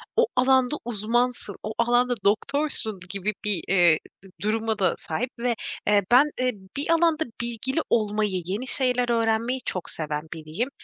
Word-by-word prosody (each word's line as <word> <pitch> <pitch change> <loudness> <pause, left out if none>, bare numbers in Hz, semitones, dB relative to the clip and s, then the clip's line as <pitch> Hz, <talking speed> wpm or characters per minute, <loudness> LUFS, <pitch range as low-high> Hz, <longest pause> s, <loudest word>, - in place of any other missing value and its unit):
o 470 +1 +4
alanda 260 +1 +3
uzmansın, 240 -1 -1
o 215 - -4
alanda 245 +1 +2
doktorsun 220 -1 +2
gibi 200 +2 -2
bir, 200 -5 +3
ııı, 175 -4 +5 0.3
dı 195 - -14
duruma 220 +1 -1
da 190 - +2
sahip 225 +11 -3
ve, 240 0 0 0.3
eee, 205 -1 +4
bende 255 -1 +4 0.3
bir 290 +3 0
alanda 330 -1 +2 0.2
bilgili 240 +5 -2
olmayı, 210 -4 0
yeni 205 +8 -3
şeyler 250 -2 +2
öğrenmeyi 230 +2 +1
çok 185 - -3
seven 150 -1 -3
biriyim. 160 - -4
230 Hz, 145 wpm, -25 LUFS, 200-250 Hz, 0.3 s, ııı